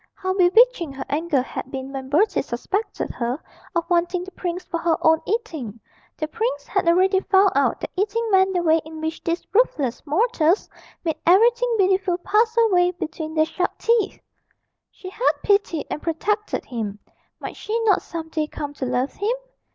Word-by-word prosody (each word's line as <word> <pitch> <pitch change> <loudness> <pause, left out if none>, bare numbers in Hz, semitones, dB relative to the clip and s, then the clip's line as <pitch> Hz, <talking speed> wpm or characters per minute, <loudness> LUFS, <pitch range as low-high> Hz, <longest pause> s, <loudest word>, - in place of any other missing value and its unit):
How 375 -1 -2
bewitching 380 - +4
her 265 - -6
anger 295 -2 +1
had 260 - -6
been 265 0 -6
when 265 -1 -6
Bertie 375 +7 +3
suspected 385 - -3
her 245 +4 -3 0.4
of 340 - 0
wanting 350 0 +1
the 380 - -10
prince 360 -1 -4
for 335 - -3
her 335 -1 +1
own 320 0 +4
eating. 315 - -3 0.4
(The 310 - -2
prince 460 +7 -2
had - - -1
already 375 +3 +4
found 390 0 +4
out 275 0 +1
that - - -5
eating 425 +4 0
meant 380 0 +4
the 350 - +1
way 320 -1 +4
in 315 0 -9
which 315 +1 -4
these 335 +1 -2
ruthless 310 - +1
mortals 350 - +2 0.4
made 320 -3 -1
everything 475 +6 +4
beautiful 375 -2 +2
pass 445 +5 +1
away 355 -1 +4
between 315 -2 -5
their 310 0 +4
sharp 365 +3 -2
teeth.) 455 -4 +1 0.7
She 370 -1 -10
had 480 +5 +2
pitied 400 -6 +1
and 300 - -3
protected 415 +6 -1
him; 220 -5 -4 0.4
might - - -6
she 445 +2 -2
not 420 -5 +3
some 325 -1 -7
day 310 -1 -1
come 290 -1 -6
to 265 -2 -4
love 250 +2 -1
him? 430 +5 -1
350 Hz, 175 wpm, -23 LUFS, 310-405 Hz, 0.7 s, bewitching